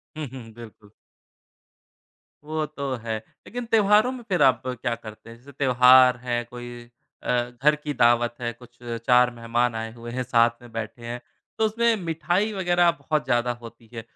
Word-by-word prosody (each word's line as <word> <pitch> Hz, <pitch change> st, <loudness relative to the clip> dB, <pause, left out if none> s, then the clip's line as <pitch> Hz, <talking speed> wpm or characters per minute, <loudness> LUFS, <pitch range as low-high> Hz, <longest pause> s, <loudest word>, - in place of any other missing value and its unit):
हुँ, 155 Hz, -1 st, -4 dB
हुँ। 120 Hz, -4 st, -9 dB
बिल्कुल। 110 Hz, -2 st, -14 dB, 1.5 s
वो 155 Hz, +1 st, -2 dB
तो 140 Hz, -3 st, -5 dB
है। 110 Hz, -1 st, -2 dB, 0.3 s
लेकिन 245 Hz, 0 st, -5 dB
त्योहारों 215 Hz, +1 st, +4 dB
में 250 Hz, -2 st, -8 dB
फिर 180 Hz, -4 st, +1 dB
आप 130 Hz, -1 st, +4 dB
क्या 125 Hz, -1 st, -2 dB
करते 110 Hz, -1 st, -12 dB
हैं? 115 Hz, -, -12 dB
जैसे 135 Hz, +4 st, -15 dB
त्योहार 125 Hz, -1 st, +6 dB
है, 120 Hz, -1 st, -1 dB
कोई 120 Hz, 0 st, -10 dB, 0.3 s
अ, -, -, -5 dB, 0.3 s
घर 150 Hz, +1 st, +5 dB
की 150 Hz, 0 st, -5 dB
दावत 120 Hz, -1 st, +3 dB
है, 120 Hz, -1 st, -2 dB
कुछ 120 Hz, 0 st, -18 dB, 0.3 s
4 125 Hz, -1 st, +5 dB
मेहमान 115 Hz, 0 st, 0 dB
आए 110 Hz, 0 st, -4 dB
हुए 120 Hz, 0 st, -9 dB
हैं, 130 Hz, +1 st, -2 dB
साथ 120 Hz, -1 st, +4 dB
में 120 Hz, -, -14 dB
बैठे 115 Hz, +1 st, -6 dB
हैं 120 Hz, +1 st, -5 dB, 0.4 s
तो 220 Hz, -, +2 dB
उसमें 230 Hz, +2 st, +2 dB
मिठाई 175 Hz, +6 st, 0 dB
वग़ैरह 175 Hz, -3 st, +3 dB
बहुत 155 Hz, -2 st, -2 dB
ज़्यादा 120 Hz, 0 st, +1 dB
होती 115 Hz, -1 st, -13 dB
है। 115 Hz, -, -5 dB
125 Hz, 175 wpm, -24 LUFS, 120-155 Hz, 1.5 s, त्योहार